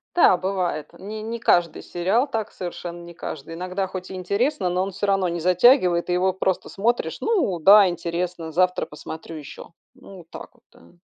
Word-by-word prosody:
Да, 345 Hz, -, +6 dB
бывает. 180 Hz, -5 st, -2 dB
Не 215 Hz, +3 st, -7 dB
не 230 Hz, +2 st, -5 dB
каждый 175 Hz, -6 st, +2 dB
сериал 195 Hz, +10 st, 0 dB
так, 225 Hz, -6 st, -3 dB
совершенно 175 Hz, -1 st, -7 dB
не 170 Hz, 0 st, -11 dB
каждый. 155 Hz, -1 st, -7 dB
Иногда, 185 Hz, +3 st, -3 dB
хоть 185 Hz, -1 st, -7 dB
и -, -, -6 dB
интересно, 200 Hz, -, -1 dB
но 180 Hz, +1 st, 0 dB
он 195 Hz, -, -4 dB
всё 195 Hz, -, -3 dB
равно 195 Hz, -2 st, +2 dB
не 170 Hz, 0 st, -3 dB
затягивает, 180 Hz, -, +4 dB
и -, -, +2 dB
его 185 Hz, +1 st, +2 dB
просто 190 Hz, 0 st, -1 dB
смотришь: 205 Hz, -5 st, -1 dB
"Ну 365 Hz, -, +1 dB
да, 200 Hz, +4 st, +8 dB
интересно. 170 Hz, -1 st, -3 dB
Завтра 180 Hz, +2 st, +1 dB
посмотрю 160 Hz, +2 st, -9 dB
еще". 150 Hz, -1 st, -10 dB, 0.2 s
Ну 255 Hz, -7 st, -14 dB
вот 165 Hz, -1 st, -16 dB
так -, -, -9 dB
вот, -, -, -29 dB
да. 85 Hz, -, -20 dB
185 Hz, 190 wpm, -23 LUFS, 170-200 Hz, 0.2 s, да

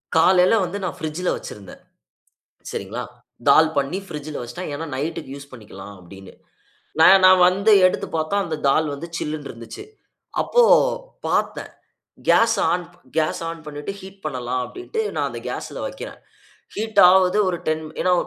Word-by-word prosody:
காலையில 180 Hz, +5 st, +5 dB
வந்து 180 Hz, +3 st, -5 dB
நான் 185 Hz, -, -4 dB
பிரிட்ஜ்‌ல 160 Hz, +3 st, -3 dB
வச்சுருந்தேன், 100 Hz, -3 st, -10 dB, 0.9 s
சரிங்களா? 110 Hz, +6 st, -5 dB, 0.5 s
தால் 155 Hz, +3 st, +6 dB
பண்ணி 140 Hz, +7 st, -1 dB
பிரிட்ஜ்‌ல 150 Hz, -2 st, -6 dB
வச்சுட்டேன். 120 Hz, +9 st, -7 dB
ஏன்னா 165 Hz, +3 st, -5 dB
நைட்‌க்கு 135 Hz, -1 st, -4 dB
யூஸ் 140 Hz, 0 st, -11 dB
பண்ணிக்கலாம் 100 Hz, -4 st, -11 dB
அப்டின்னு. 95 Hz, +2 st, -13 dB, 0.7 s
நான் 190 Hz, +3 st, +7 dB
நான் 185 Hz, -1 st, +7 dB
வந்து 195 Hz, +4 st, +2 dB
எடுத்து 185 Hz, -, +1 dB
பாத்தா, 155 Hz, +5 st, -1 dB
அந்த 160 Hz, -2 st, -3 dB
தால் 155 Hz, +3 st, +2 dB
வந்து 150 Hz, +4 st, -7 dB
சில்லுனு 150 Hz, -2 st, -4 dB
இருந்துச்சு. 115 Hz, -1 st, -9 dB, 0.6 s
அப்போ 485 Hz, -, +3 dB, 0.7 s
பாத்தேன். -, -, -1 dB, 0.6 s
கேஸ் 230 Hz, 0 st, +5 dB, 0.2 s
ஆன் 180 Hz, +1 st, 0 dB, 0.3 s
கேஸ் 155 Hz, +1 st, 0 dB
ஆன் 165 Hz, -, -7 dB
பண்ணிட்டு 150 Hz, +3 st, -6 dB
ஹீட் 195 Hz, +1 st, -13 dB
பண்ணலாம் 125 Hz, -3 st, -2 dB
அப்டின்ட்டு 375 Hz, +5 st, -5 dB
நான் -, -, 0 dB
அந்த -, -, -7 dB
கேஸ்ல -, -, -6 dB
வக்கிறேன். -, -, -8 dB, 0.6 s
ஹீட் 220 Hz, +1 st, +1 dB
ஆவுது, 185 Hz, +1 st, +4 dB
ஒரு 175 Hz, -, -2 dB
10 155 Hz, 0 st, -1 dB, 0.2 s
ஏன்னா, 180 Hz, -, +2 dB
160 Hz, 145 wpm, -22 LUFS, 140-185 Hz, 0.9 s, நான்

